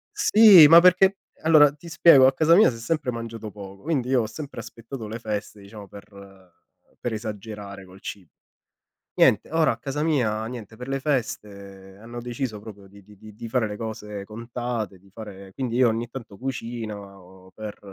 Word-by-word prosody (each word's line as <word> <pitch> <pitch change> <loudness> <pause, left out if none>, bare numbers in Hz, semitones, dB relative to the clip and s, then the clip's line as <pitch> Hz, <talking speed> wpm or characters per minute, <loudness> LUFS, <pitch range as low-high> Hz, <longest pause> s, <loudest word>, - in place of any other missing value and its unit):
sì, 210 - +8
ma 165 +3 +9
perché 185 +2 +4 0.3
allora, 155 -3 +6
ti 150 +3 -15
spiego, 165 -5 +6
a 135 - +4
casa 160 +4 +4
mia 210 - +6
si 115 - -7
è - - -11
sempre 135 +2 -2
mangiato 115 -2 -7
poco, 100 -1 -12
quindi 140 -5 -2
io 130 -2 +3
ho - - -2
sempre 140 +6 -9
aspettato 115 0 -9
le 110 +2 -7
feste, 105 -1 -5
diciamo, 100 0 -12
per 95 -2 -16 0.4
per 120 - -4
esagerare 105 -2 -7
col 95 +1 -17
cibo. 95 -5 -9 0.8
Niente, 105 - +3
ora 160 -3 +2
a - - -7
casa 140 +5 -4
mia 115 -9 0
niente, 115 -2 -9
per 125 +2 -9
le 135 0 -3
feste 100 -8 -5
hanno 120 +2 -9
deciso 120 -2 -5
proprio 105 -2 -12
di 100 +1 -17
di 105 +2 -18
di 110 +1 -14
di 115 +2 -8
fare 115 -1 0
le 105 -1 -6
cose 105 -2 -7
contate, 115 -2 -5
di 100 +1 -23
fare 100 -3 -11
quindi 125 +1 -4
io 125 -1 +4
ogni 115 +1 -2
tanto 115 -5 -10
cucino 100 -7 -8
per 110 -1 -8
115 Hz, 185 wpm, -24 LUFS, 100-130 Hz, 0.8 s, ma